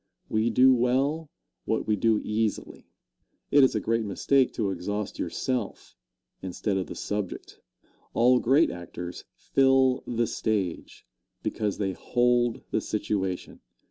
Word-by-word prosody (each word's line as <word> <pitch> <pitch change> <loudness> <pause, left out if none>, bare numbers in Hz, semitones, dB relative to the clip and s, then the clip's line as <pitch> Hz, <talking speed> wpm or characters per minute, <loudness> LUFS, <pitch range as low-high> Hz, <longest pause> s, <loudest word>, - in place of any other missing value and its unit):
We 110 +2 +1
do 130 +3 +6
well 135 +6 +1 0.4
what 110 - -1
we 105 - +2
do 110 +1 +2
easily. 110 0 -2 0.6
It 145 -1 +6
is 130 - +3
a - - +2
great 115 0 0
mistake 125 +6 +2
to 105 -4 -1
exhaust 100 +3 -4
yourself, 115 +5 -3 0.5
instead 95 +2 -2
of 95 -1 -2
the - - -7
subject. 105 -3 -5 0.6
All 125 +2 +5
great 135 +8 +3
actors 85 0 -8
"fill 135 -1 +3
the 120 -1 0
stage" 100 -7 -3 0.4
because 105 -3 -2
they 95 -2 -1
hold 120 +3 +1
the - - +1
situation. 100 -3 -3
110 Hz, 130 wpm, -27 LUFS, 100-125 Hz, 0.6 s, do